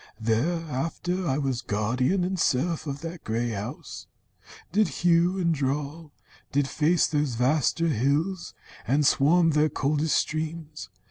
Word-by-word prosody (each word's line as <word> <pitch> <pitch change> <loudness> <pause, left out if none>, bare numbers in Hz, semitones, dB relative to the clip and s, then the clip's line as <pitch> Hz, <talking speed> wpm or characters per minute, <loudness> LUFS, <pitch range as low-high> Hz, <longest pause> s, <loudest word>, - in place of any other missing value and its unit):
"Thereafter 165 +8 -1
I 130 - +1
was 135 -4 -1
guardian 125 - 0
and 185 0 -2
serf 160 +4 0
Of 140 0 -4
that 165 0 -7
grey 115 +2 -1
house; 105 -2 -6 0.6
did 210 +4 +3
hew 175 +2 +2
and 170 -3 +1
draw, 145 +3 -3 0.4
did 140 0 +1
face 160 +5 +2
Those 145 -5 -1
vaster 150 +6 +1
hills, 150 - -1 0.3
and 145 +4 +2
swam 165 +5 +4
their 150 +1 +3
coldest 150 +3 0
streams. 155 - -4
150 Hz, 130 wpm, -26 LUFS, 135-170 Hz, 0.6 s, swam